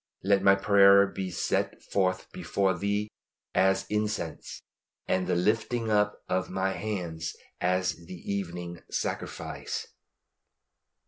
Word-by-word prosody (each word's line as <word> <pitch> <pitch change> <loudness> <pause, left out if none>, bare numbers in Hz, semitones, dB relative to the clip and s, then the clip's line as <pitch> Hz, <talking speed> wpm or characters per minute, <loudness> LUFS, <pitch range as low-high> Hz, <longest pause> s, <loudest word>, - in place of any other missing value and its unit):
"LET 100 0 +3
MY 100 0 +6
PRAYER 100 0 +6
BE 95 -1 -4
SET 90 - -1
FORTH 95 -1 0
BEFORE 95 -2 0
THEE 100 +3 -1 0.4
AS 95 0 +3
INCENSE: 105 -5 -3 0.5
AND 95 -1 +1
THE 90 - +1
LIFTING 115 +5 +1
UP 105 0 +2
OF 95 0 0
MY 95 +1 0
HANDS 90 -7 -4 0.2
AS 90 -2 0
THE 90 - -7 0.2
EVENING 85 -3 -4
SACRIFICE." - - -4
95 Hz, 115 wpm, -28 LUFS, 90-100 Hz, 0.5 s, MY